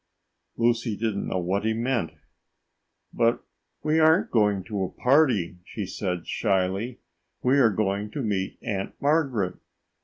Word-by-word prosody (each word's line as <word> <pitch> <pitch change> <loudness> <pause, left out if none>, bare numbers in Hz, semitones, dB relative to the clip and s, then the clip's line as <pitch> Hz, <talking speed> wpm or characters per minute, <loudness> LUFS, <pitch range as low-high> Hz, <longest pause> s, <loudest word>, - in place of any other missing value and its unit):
Lucy 115 -2 +1
didn't 110 -2 -2
know - - -1
what 95 +3 -1
he 110 0 +1
meant. 115 -5 -1 1.0
"But 115 0 +2 0.4
we 155 +1 +2
aren't 160 +3 +4
going 105 -4 +2
to 105 -1 -4
a 90 - -2
party," 125 - +2
she 105 +2 -5
said 90 -2 -3
shyly. 100 +3 -1 0.4
"We 130 +3 +4
are 120 -4 +6
going 105 0 -1
to 140 - -3
meet 100 -3 -2
Aunt 95 -2 -4
Margaret." 140 - +1
110 Hz, 140 wpm, -26 LUFS, 95-125 Hz, 1.0 s, are